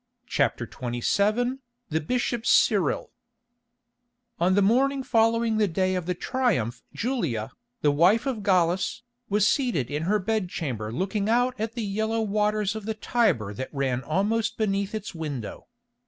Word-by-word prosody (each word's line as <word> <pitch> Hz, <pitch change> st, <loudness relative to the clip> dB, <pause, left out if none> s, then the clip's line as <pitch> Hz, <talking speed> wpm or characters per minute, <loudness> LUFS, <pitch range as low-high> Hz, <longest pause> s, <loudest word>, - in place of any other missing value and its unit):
CHAPTER 125 Hz, -, 0 dB
XXVII 205 Hz, -, 0 dB, 0.3 s
THE 160 Hz, +1 st, 0 dB
BISHOP 240 Hz, +5 st, -1 dB
CYRIL 195 Hz, -, +3 dB, 1.3 s
On 180 Hz, +2 st, +3 dB
the 205 Hz, -, +4 dB
morning 265 Hz, +6 st, +2 dB
following 230 Hz, -2 st, +2 dB
the 215 Hz, -1 st, +3 dB
day 185 Hz, +2 st, 0 dB
of 180 Hz, -2 st, -3 dB
the 180 Hz, -, 0 dB
Triumph 185 Hz, -, -1 dB
Julia, 170 Hz, -, -2 dB, 0.3 s
the 145 Hz, -, +4 dB
wife 180 Hz, -, +4 dB
of 255 Hz, -6 st, -2 dB
Gallus, 185 Hz, +2 st, +1 dB, 0.3 s
was 205 Hz, 0 st, +3 dB
seated 235 Hz, -, 0 dB
in 150 Hz, +1 st, -1 dB
her 210 Hz, -, +4 dB
bed 210 Hz, -1 st, -1 dB
chamber 115 Hz, -11 st, -4 dB
looking 195 Hz, -, -1 dB
out 245 Hz, +2 st, +3 dB
at 220 Hz, +1 st, -2 dB
the 235 Hz, -2 st, -3 dB
yellow 220 Hz, +3 st, -1 dB
waters 210 Hz, 0 st, 0 dB
of 220 Hz, -2 st, -6 dB
the 220 Hz, 0 st, -2 dB
Tiber 195 Hz, -, +1 dB
that 130 Hz, +6 st, -5 dB
ran 135 Hz, -3 st, -1 dB
almost 205 Hz, +10 st, 0 dB
beneath 200 Hz, -1 st, -1 dB
its 210 Hz, -2 st, -5 dB
window. 145 Hz, -, -6 dB
205 Hz, 150 wpm, -26 LUFS, 160-225 Hz, 1.3 s, the